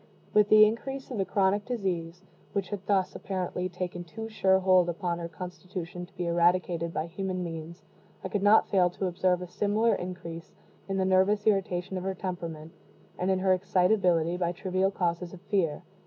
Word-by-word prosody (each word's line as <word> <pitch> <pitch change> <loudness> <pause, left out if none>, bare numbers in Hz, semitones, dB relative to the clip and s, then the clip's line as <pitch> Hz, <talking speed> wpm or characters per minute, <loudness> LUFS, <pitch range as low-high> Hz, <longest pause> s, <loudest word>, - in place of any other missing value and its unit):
With 210 -1 +5
the 215 0 +9
increase 270 +5 -3
of 235 - -3
the 195 - +1
chronic 195 +2 +2
disease, 180 -7 -3 0.3
which 195 -2 -2
had 200 -2 -5
thus, 195 -3 +2
apparently, 185 -1 -3
taken 180 0 -5
too 220 +6 -7
sure 190 -3 +3
hold 185 -2 +4
upon 175 0 -2
her 170 - -4
constitution 180 0 -7
to 195 - -27
be 180 -2 -3
eradicated 170 0 +2
by 155 - -2
human 185 +1 -3
means, 165 +1 -7 0.4
I - - -2
could 205 +1 -1
not 205 +2 +5
fail 185 -3 +3
to 185 +2 -4
observe 180 0 +1
a - - -7
similar 210 +5 +1
increase 170 -2 -6 0.4
in 195 - -1
the 190 - +1
nervous 190 +2 +3
irritation 190 -3 0
of 180 - -4
her 190 0 -2
temperament, 170 -4 -5 0.5
and 180 - 0
in 190 - +3
her 185 0 +3
excitability 180 -2 +2
by 175 -1 0
trivial 185 +1 0
causes 175 -2 -2
of 180 - -11
fear. 175 -6 +1
185 Hz, 185 wpm, -28 LUFS, 175-195 Hz, 0.5 s, the